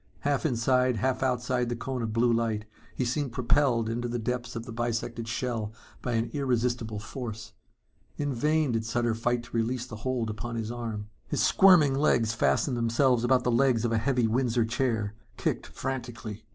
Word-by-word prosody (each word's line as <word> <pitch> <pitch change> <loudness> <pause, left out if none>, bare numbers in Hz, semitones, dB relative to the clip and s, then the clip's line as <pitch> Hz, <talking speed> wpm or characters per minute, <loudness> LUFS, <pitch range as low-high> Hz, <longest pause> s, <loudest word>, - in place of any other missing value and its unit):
Half 145 +2 +1
inside, 125 0 +2
half 130 +4 0
outside 125 -1 0
the 120 - -1
cone 130 +1 -4
of 115 -1 -2
blue 115 +2 +3
light 115 -2 0 0.3
he 130 - 0
seemed 130 +1 -1
propelled 125 -2 +2
into 120 +2 -2
the 120 0 -2
depths 125 +2 -3
of 115 0 -4
the 120 - -8
bisected 115 0 -2
shell 115 -3 -2 0.3
by 125 - -2
an 115 0 0
irresistible 120 -5 0
force. 110 -1 -6 0.6
In 145 -2 -1
vain 150 +3 +2
did 115 -1 0
Sutter 120 +1 0
fight 120 +1 0
to 120 - -10
release 115 +2 0
the 120 -4 -8
hold 120 -1 -1
upon 115 +2 -5
his 115 0 -3
arm. 110 -3 -5 0.2
His - - 0
squirming 180 -9 +6
legs 120 -5 +2
fastened 115 - +1
themselves 120 +1 +2
about 125 0 +3
the 125 - +1
legs 120 -1 +3
of 115 - 0
a 115 - +2
heavy 125 0 +1
Windsor 120 0 +1
chair, 115 -3 -1 0.2
kicked - - -1
frantically. 120 -5 -5
120 Hz, 180 wpm, -28 LUFS, 115-130 Hz, 0.6 s, squirming